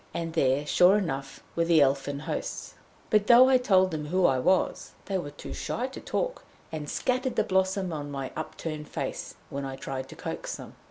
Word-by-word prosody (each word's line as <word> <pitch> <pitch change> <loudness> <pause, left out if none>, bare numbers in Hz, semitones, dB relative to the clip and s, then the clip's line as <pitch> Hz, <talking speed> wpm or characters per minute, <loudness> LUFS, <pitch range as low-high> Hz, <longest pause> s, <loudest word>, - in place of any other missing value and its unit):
And 165 -1 -3
there, 140 -2 +2
sure 180 +6 +5
enough, 135 -8 -4
were 170 - +2
the 165 -1 +5
Elfin 140 0 +2
hosts. - - -4 0.4
But 210 -1 +3
though 245 +2 +8
I 260 -1 +5
told 190 -6 +4
them 150 -2 -4
who 180 +3 +2
I 130 -4 +4
was, 185 +8 +1
they 195 -1 -1
were 145 - -5
too 145 - -9
shy 245 - -2
to 265 - -9
talk, - - -2 0.3
and 150 -2 -5
scattered 255 0 -1
the - - +3
blossom 190 -1 +1
on 145 -2 -4
my 135 -2 -4
upturned 155 -1 -5
face, - - -4 0.2
when 140 0 -3
I 135 -1 -4
tried 135 0 -5
to - - -10
coax - - -5
them. - - -10
165 Hz, 200 wpm, -28 LUFS, 140-190 Hz, 0.4 s, though